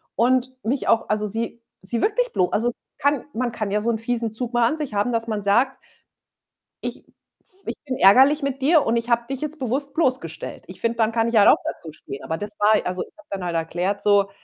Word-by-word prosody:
und 255 +1 +2
mich 255 +5 -1
auch 230 -2 +2
also, 210 0 0
sie 230 +2 -4 0.2
sie 225 +5 -2
wirklich - - +1
blo 180 - +2
also, 240 +3 +1 0.3
kann 285 -2 +1
man 240 +1 -1
kann 215 -3 -3
ja 210 0 +1
so 235 +2 +1
‘n 220 - -1
fiesen 230 -1 -2
Zug 245 +1 -3
mal 240 -1 +4
an 310 - -1
sich 295 -8 -4
haben, 205 +4 +1
dass 230 0 -1
man 210 -2 -2
sagt: 240 +7 +2 1.1
„Ich - - -4
f - - -26 0.6
ich - - -3
bin 255 -1 -2
ärgerlich 265 +10 +6
mit 275 -1 -2
dir 305 +3 +4
und 230 +1 +1
ich 230 +1 -2
habe 235 0 +3
dich 270 - -3
jetzt 305 +1 -4
bewusst 275 +3 -1
bloßgestellt.“ 255 - -1
Ich 185 - -9
finde, 230 0 0
dann 225 0 +2
kann 230 0 +1
ich 230 - -3
halt 205 - +7
auch - - +8
da - - -3
zu 160 - -10
stehen. 135 - -9
Aber 160 - -3
das 205 +2 -6
war 210 +1 +5
also, 180 0 -2
ich - - -13
habe 310 - -18
dann 195 -2 -4
halt 170 -1 -3
erklärt 175 +5 -1
so: 200 -1 +4
230 Hz, 240 wpm, -23 LUFS, 205-260 Hz, 1.1 s, auch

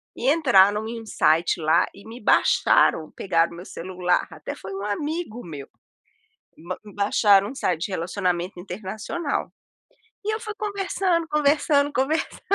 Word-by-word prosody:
e 255 - 0
entraram 215 -9 +4
em 230 0 -5
um - - -12
site 165 -3 +2
lá 160 +2 +3
e 200 - -15
me 230 +2 -10
baixaram, 160 -5 +3
pegaram 170 -3 0
meu 175 +2 -10
celular, 180 -1 -1
até - - -7
foi 190 0 -9
um 195 +1 -5
amigo 290 +2 -3
meu. 145 -5 -8 1.0
Ba 185 - -3 0.3
baixaram 200 -1 +4
um 270 - -9
site 175 -9 -1
de - - -6
relacionamento 180 0 -2
internacional. 215 - -4 0.7
E 430 - 0
eu 440 - -4
fui 430 -2 -6
conversando, 390 -4 -1
conversando, 290 -1 +2
conversando, 295 +5 -1
205 Hz, 145 wpm, -24 LUFS, 180-290 Hz, 1.0 s, entraram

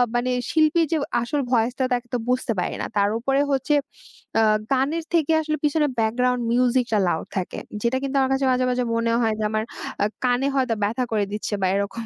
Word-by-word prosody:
মানে 250 +1 +1 0.2
শিল্পীর 320 +1 +3
যে 325 - +2 0.2
আসল 280 +5 -1
ভয়েসটা 245 +2 +1
তাকে 245 0 -2
তো - - +2
বুঝতে 250 -1 0
পারি - - -2
না। - - -2
তার 200 0 +3
উপরে 270 +3 +1
হচ্ছে 275 +2 +1 0.7
আ - - +5 0.3
গানের 285 +5 +1
থেকে 325 -2 +2
আসলে 310 0 -2
পিছনে 295 0 +2
ব্যাকগ্রাউন্ড 250 +3 +1
মিউজিকটা 245 -2 +2
লাউড 160 -2 -1
থাকে, 180 - -3 0.2
যেটা 240 +2 +1
কিন্তু 275 0 -3
আমার 265 0 +1
কাছে 270 0 +1
মাঝে, 255 0 +2
মাঝে 250 0 0
মনে 230 0 +1
হয় 220 -1 +2
যে - - -1
আমার 215 0 -1 0.4
আ - - +4 0.2
কানে 250 +2 +2
হয়তো 255 -4 +1
ব্যথা 230 +5 0
করে 210 -2 +1
দিচ্ছে, 210 0 -4
বা - - +2
এরকম। 200 +3 -3
250 Hz, 200 wpm, -23 LUFS, 230-275 Hz, 0.7 s, আ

